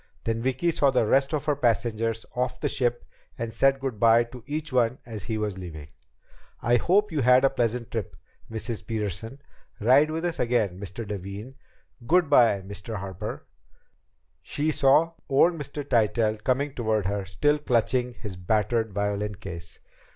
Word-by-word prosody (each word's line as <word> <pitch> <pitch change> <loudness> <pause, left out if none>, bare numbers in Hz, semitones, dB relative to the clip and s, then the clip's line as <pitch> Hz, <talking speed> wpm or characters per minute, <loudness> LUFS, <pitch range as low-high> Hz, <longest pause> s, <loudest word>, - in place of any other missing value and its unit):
Then 115 0 -1
Vicki 130 +7 +1
saw 140 -3 +3
the 125 -4 +2
rest 135 +5 +3
of 150 -2 -2
her 150 -2 +2
passengers 115 -3 0
off 125 0 -1
the - - 0
ship 120 -2 0 0.3
and 115 -1 -4
said 135 +4 +3
good 130 -6 -4
by 115 +1 +6
to 120 0 -12
each 150 -1 -4
one 125 0 +2
as 110 -4 -7
he 110 -2 -2
was 105 -3 -3
leaving. 80 -5 -8 0.7
"I 120 +1 +3
hope 200 - +2
you 155 -3 0
had 125 +2 +5
a 135 - +3
pleasant 120 0 -1
trip, 110 -5 -4 0.3
Mrs. 115 0 -3
Peterson. 110 +4 -4 0.4
Ride 130 +8 +5
with 160 +2 -3
us 170 -1 -2
again, 115 -7 +1
Mr. 100 +3 -6
Levin. 100 +5 -6 0.5
Good 175 -3 +3
by, 115 -8 +5
Mr. 100 +3 -6
Harper." 95 +1 -6 1.0
She 150 +2 -1
saw 150 +4 +4 0.2
old 145 +6 +4
Mr. 145 -2 -6
Tytell 110 -2 +2
coming 135 +2 0
toward 110 -5 0
her, 100 +1 -1
still 145 - +1
clutching 125 -1 0
his 105 -6 -7
battered 110 +4 0
violin 105 +1 -1
case. 85 -4 -8
115 Hz, 165 wpm, -26 LUFS, 105-135 Hz, 1.0 s, by